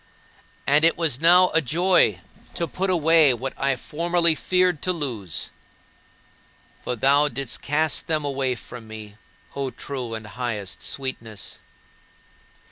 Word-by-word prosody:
And 145 +3 +4
it 165 - +4
was 155 -5 +1
now 180 +2 +6
a 160 - +4
joy 175 +6 +2 0.3
to 170 - -1
put 190 +5 -2
away 160 -5 +5
what 130 +3 -4
I 135 0 0
formerly 170 +5 +1
feared 180 0 +1
to 185 - 0
lose. 120 - -4 1.3
For 125 - -2
thou 140 +5 +3
didst 135 -2 -3
cast 155 +2 0
them 155 -3 0
away 135 -2 -1
from 120 -1 -11
me, 110 -1 -10 0.4
O 140 -1 -2
true 125 -2 -6
and 110 -1 -8
highest 105 -3 -5
Sweetness. 115 -6 -5
140 Hz, 130 wpm, -23 LUFS, 120-165 Hz, 1.3 s, now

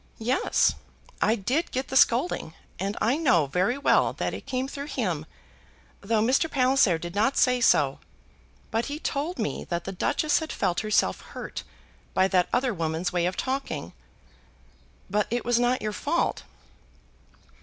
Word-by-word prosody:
"Yes; 245 +4 +2 0.5
I 220 - +3
did 255 - -1
get 260 +1 -3
the 265 - -4
scolding, 240 - +2 0.2
and 195 +3 -2
I 240 +6 +2
know 185 - +3
very 185 - 0
well 280 - +3
that - - -3
it - - -8
came 260 0 -1
through 280 +1 -6
him, 180 - -2 0.7
though 215 +1 +1
Mr. 270 +7 +2
Palliser 255 - +3
did 175 +1 -7
not 220 +7 +1
say 250 -1 +3
so. - - +3 0.7
But 225 +1 0
he 290 - -4
told 310 +3 -3
me 220 - -2
that 170 -1 -3
the 195 - -5
Duchess 290 - +1
had 320 -1 -5
felt 175 - 0
herself 215 -1 +1
hurt - - -7 0.5
by 190 - +4
that 180 -2 +2
other 250 -1 +1
woman's 165 0 -2
way 175 -1 +1
of 180 - -3
talking." 270 +1 -3 1.1
"But 210 +2 0
it 240 +1 -2
was 240 -1 +2
not 245 0 +1
your 215 0 -2
fault." 325 +10 -1
235 Hz, 160 wpm, -26 LUFS, 185-270 Hz, 1.1 s, by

